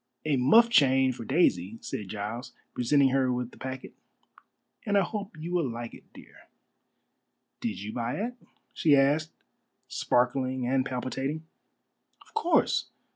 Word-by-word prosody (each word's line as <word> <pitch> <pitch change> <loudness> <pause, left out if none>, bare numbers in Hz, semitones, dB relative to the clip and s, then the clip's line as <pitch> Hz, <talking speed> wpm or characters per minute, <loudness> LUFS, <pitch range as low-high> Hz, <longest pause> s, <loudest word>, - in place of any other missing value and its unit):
"A 150 -2 +2
muff 145 - +6
chain 135 - +4
for 120 -2 -8
Daisy," 110 - +2
said 105 - -5
Giles, 105 +5 -5 0.2
presenting 135 +2 +3
her 130 -1 +2
with 125 -1 -3
the - - -16
packet, 130 0 -6 0.9
"and 205 -3 +1
I - - +5
hope 200 -1 -4
you 165 +3 -5
will 165 -7 +1
like 120 0 -6
it, - - -15
dear." - - -16 1.1
"Did - - -3
you 105 +2 -6
buy 120 0 -2
it?" 235 +4 -3 0.4
she 150 -3 +4
asked, 145 +3 +3 0.6
sparkling 130 +1 0
and 130 +1 +1
palpitating. 135 +4 -3 0.8
"Of - - -23
course. 355 -6 +2
130 Hz, 140 wpm, -28 LUFS, 125-155 Hz, 1.1 s, muff